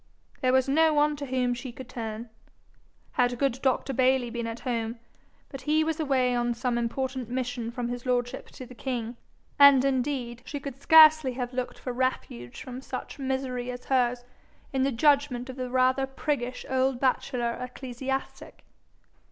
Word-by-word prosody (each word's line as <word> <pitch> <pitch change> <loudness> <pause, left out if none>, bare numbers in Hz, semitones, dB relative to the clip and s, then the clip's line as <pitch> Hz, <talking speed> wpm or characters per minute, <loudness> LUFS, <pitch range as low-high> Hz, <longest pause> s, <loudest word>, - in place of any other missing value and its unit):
There 255 -2 +3
was 260 0 +3
no 315 +3 +4
one 295 0 +3
to 285 -1 -5
whom 250 -1 0
she 245 +1 -6
could 255 +1 -10
turn. 225 -2 -6 0.8
Had 245 0 +1
good 265 -1 0
Dr. 265 0 0
Bayly 255 -1 +2
been 235 -1 -3
at 230 +1 -6
home 230 -2 -2 0.5
but 270 - -8
he 310 +1 +2
was 320 0 -2
away 265 -5 +2
on 240 0 0
some 240 0 -1
important 255 +1 -3
mission 245 -2 -3
from 240 0 -4
his 245 0 -5
lordship 245 -1 -1
to 255 - -10
the 250 - -12
king: 240 -2 -4 0.4
and 280 -2 +8
indeed 255 -3 -1
she 290 - -5
could 275 -1 -8
scarcely 310 -4 +7
have 250 0 -4
looked 255 0 -3
for 250 - -5
refuge 240 - -3
from 255 0 -7
such 265 +2 -7
misery 260 -2 -2
as 245 0 -7
hers 245 -2 +1 0.5
in 265 - +1
the 275 +1 +2
judgment 270 -1 +2
of - - -11
the 255 -1 -4
rather 260 +1 +2
priggish 265 -2 -3
old 260 -1 +1
bachelor 250 -2 0
ecclesiastic. 260 +1 -5
255 Hz, 170 wpm, -27 LUFS, 245-270 Hz, 0.8 s, and